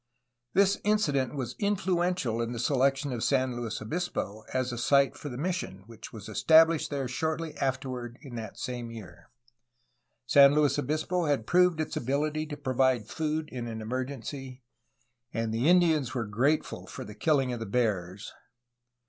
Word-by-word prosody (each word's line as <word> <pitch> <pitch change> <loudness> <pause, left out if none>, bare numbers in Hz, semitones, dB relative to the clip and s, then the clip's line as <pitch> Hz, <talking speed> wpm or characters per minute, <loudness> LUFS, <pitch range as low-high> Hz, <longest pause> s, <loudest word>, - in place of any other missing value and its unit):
This 200 +1 +4
incident 150 - +1
was 130 -3 -4
influential 180 - 0
in 115 +1 -2
the - - -5
selection 135 +2 +1
of 115 - -3
San 130 -2 +1
Luis 115 -2 -4
Obispo 110 - -3
as 130 -1 -1
a 120 - -5
site 140 +2 +3
for 145 - -7
the 125 - -6
mission 165 - -3
which 115 0 -11
was 110 -3 -9
established 160 0 +4
there 140 -3 -2
shortly 160 +4 -2
afterward 130 -3 -3
in 135 -4 -10
that 110 -3 -6
same 120 -2 -4
year; 115 -4 -11 1.0
San 140 0 +7
Luis 145 -2 +3
Obispo 155 +5 -1
had 140 -7 0
proved 180 0 +3
its 155 - -2
abiUty 150 +4 -1
to 145 - -5
provide 130 -5 +1
food 155 0 -2
in 120 -2 -5
an 110 -1 -5
emergency, 130 +2 -5 0.7
and 115 0 -1
the 120 +8 +2
Indians 160 -8 +3
were 120 -3 -1
grateful 130 +9 0
for - - -7
the 105 - -9
kill 150 +6 +2
ing 130 -2 -1
of 120 - -4
the 115 - -5
bears. 100 -4 -1
135 Hz, 165 wpm, -29 LUFS, 120-155 Hz, 1.0 s, San